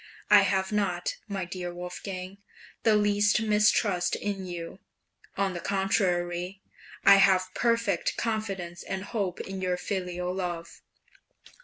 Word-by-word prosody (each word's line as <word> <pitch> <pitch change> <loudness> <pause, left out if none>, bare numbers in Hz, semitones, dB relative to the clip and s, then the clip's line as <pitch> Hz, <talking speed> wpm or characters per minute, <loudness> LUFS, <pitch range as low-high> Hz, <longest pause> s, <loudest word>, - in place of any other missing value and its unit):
I 205 -1 +9
have 190 0 +1
not, 190 -4 -1
my 195 -3 -3
dear 175 0 -5
Wolfgang, 185 +2 -7 0.4
the 220 -2 +4
least 205 0 +3
mistrust 210 -3 +2
in 195 -2 -4
you; 175 +1 -6 0.6
on 195 -1 +1
the 175 - -4
contrary, 180 -1 0 0.5
I 200 0 +9
have 185 -1 +4
perfect 230 0 +1
confidence 195 -6 -3
and 190 0 -4
hope 200 -5 -3
in 190 0 -6
your 180 -1 0
filial 180 -2 -3
love. 175 -3 -5
190 Hz, 125 wpm, -28 LUFS, 180-205 Hz, 0.6 s, I